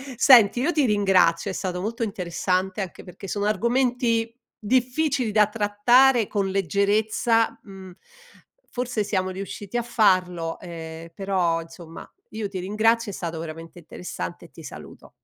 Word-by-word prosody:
Senti, 240 -2 +6
io 310 +7 +1
ti 295 -6 +2
ringrazio, 195 -3 +2
è - - -6
stato 180 -2 -3
molto 225 +5 -4
interessante, 185 -1 -2
anche 185 - -7
perché 185 +2 -11
sono 205 +2 -2
argomenti 235 +1 0 0.2
difficili 255 +3 0
da 210 0 +5
trattare 230 +4 +3
con 200 -1 -2
leggerezza, 210 - +1
mhmm. 190 -3 -12 0.8
Forse 245 -4 -2
siamo 185 -2 -1
riusciti 195 +3 -6
a 240 - -1
farlo 180 -7 +1
e 165 -1 -9
però, 180 -3 0
insomma, 165 0 -12 0.2
io 215 -1 -4
ti 195 - -6
ringrazio, 220 +3 +1
è - - -10
stato 170 -3 -5
veramente 165 +1 -8
interessante 160 - -7
e - - -16
ti - - -14
saluto. - - -11
200 Hz, 140 wpm, -24 LUFS, 180-230 Hz, 0.8 s, Senti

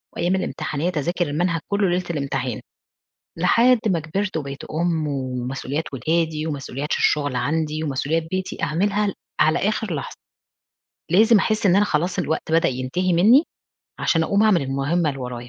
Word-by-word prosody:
وأيام 180 +2 +1
الامتحانات 160 -1 -2
أذاكر 175 +3 -1
المنهج 165 +3 0
كُلّه 200 -2 +2
ليلة 180 +1 0
الامتحان. 135 -6 -2 0.8
لحد 235 +8 +4
ما 180 -6 +2
كبرت 190 +5 -3
وبقيت 140 -3 -5
أُم 160 -1 -1
ومسؤوليات 130 +2 -3
ولادي 155 +3 -1
ومسؤوليات 140 -1 -4
الشغل 145 -3 +1
عندي 155 +3 -1
ومسؤوليات 150 +3 -1
بيتي 185 0 -4
أعملها 200 +7 +1
ال 200 - -2 0.3
على 155 - +4
آخر 210 -3 -1
لحظة. 140 - -5 0.9
لازم 220 +4 +6
أحس 215 +1 +1
إن 185 -1 +5
أنا 205 - +4
خلاص 180 0 -1
الوقت 160 -1 -2
بدأ 165 - +4
ينتهي 130 +9 -1
منّي 220 - +6 0.6
عشان 165 - +2
أقوم 200 +5 +2
أعمل 205 -8 +4
المهمة 140 +5 0
اللي 135 -2 -4
ورايا. 125 -1 -6
160 Hz, 150 wpm, -22 LUFS, 140-185 Hz, 0.9 s, لازم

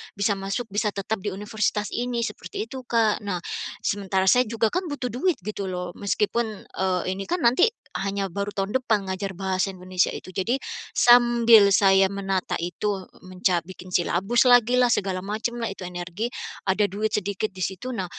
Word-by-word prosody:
bisa 200 0 0
masuk 195 +4 -4
bisa 210 +2 0
tetap 205 +1 -2
di 190 0 -4
universitas 210 +1 -1
ini, 240 -1 -1
seperti 405 - -5
itu 270 -12 -7
Kak. 225 -3 +2
Nah, 185 -4 -4 0.4
sementara 195 -1 0
saya 245 +6 +4
juga 225 0 0
kan 365 0 -1
butuh 270 -3 -3
duit 335 +8 0
gitu 210 -1 -4
loh, 180 -1 -4
meskipun, 210 +3 0 0.3
eee, 185 -1 +1 0.2
ini 195 - -4
kan 355 - -1
nanti 250 - +5 0.3
hanya 195 0 -2
baru 200 +3 -4
tahun 200 +5 0
depan 220 -6 0
ngajar 190 +1 -3
bahasa 190 +1 -1
Indonesia 185 0 0
itu. - - -8
Jadi 195 +8 -1 0.3
sambil 235 -4 +6
saya 195 -1 +5
menata 195 -2 -2
itu, 190 +3 -3 0.2
menca 185 0 +1
bikin 185 0 -11
silabus 195 +8 +2
lagi 245 -1 +5
lah, 250 -1 +4
segala 185 -2 -1
macam 220 +4 -2
lah 235 - -2
itu - - -15
energi, 180 +5 -4 0.4
ada 190 +2 +3
duit 205 +2 -1
sedikit 205 +1 -2
di 185 -1 -6
situ. 190 +7 -5
Nah, 190 -4 -2
200 Hz, 175 wpm, -25 LUFS, 190-235 Hz, 0.4 s, sambil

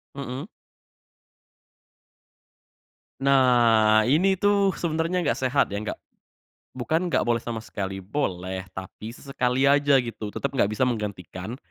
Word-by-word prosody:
Mhm. 140 +3 -6 2.7
Nah, 120 -5 +4
ini 185 +7 +3
tuh 200 -1 +3
sebenernya 165 +2 -1
gak 145 - 0
sehat 130 - +2
ya, 100 - -2
nggak 110 - -5 0.8
bukan 160 +8 -1
nggak - - +1
boleh 120 -1 +1
sama 115 -2 -4
sekali, 95 -2 -5
boleh 95 -5 -3
tapi 95 +4 -8
sesekali 130 0 -1
aja 140 0 +4
gitu 115 -4 -4
tetep 140 +6 -3
nggak 110 -6 +1
bisa 110 +4 +1
menggantikan 105 -2 -4
125 Hz, 120 wpm, -25 LUFS, 110-140 Hz, 2.7 s, Nah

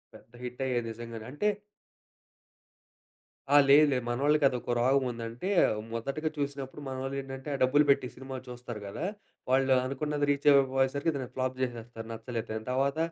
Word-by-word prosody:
పెద్ద 115 - -17
హిట్ 125 +1 -6
అయ్యేది 120 -3 -1
నిజంగానే. 115 -1 -8
అంటే 180 +9 -1 2.0
ఆ! 145 - +4
లేదు. 145 +2 +8
లేదు. 125 -2 0
మనోళ్లకి 145 +4 +2
అది 125 - -1
ఒక 120 - -2
రోగం 135 +3 +3
ఉంది. 115 -1 -6
అంటే 120 +12 -5 0.4
మొదటగా 140 +7 -2
చూసినప్పుడు 140 0 -4
మనోళ్ళేంటంటే, 135 +1 -5
ఆ - - -2
డబ్బులు 145 +4 +4
పెట్టి 130 - +2
సినిమాలు 130 0 -7
చూస్తారు 120 -3 -7
కదా! 100 - -4 0.5
వాళ్లు 135 0 +4
అనుకున్నది 145 +2 -1
రీచ్ 140 0 -1
అవకపోయేసరికి 135 +3 +2
దాన్ని 130 -3 -4
ఫ్లాప్ 130 0 -1
చేసేస్తారు, 120 -2 -5
నచ్చలేదు 115 0 -5
అని. 110 - -8
తర్వాత 135 +3 +1
130 Hz, 150 wpm, -29 LUFS, 120-140 Hz, 2.0 s, లేదు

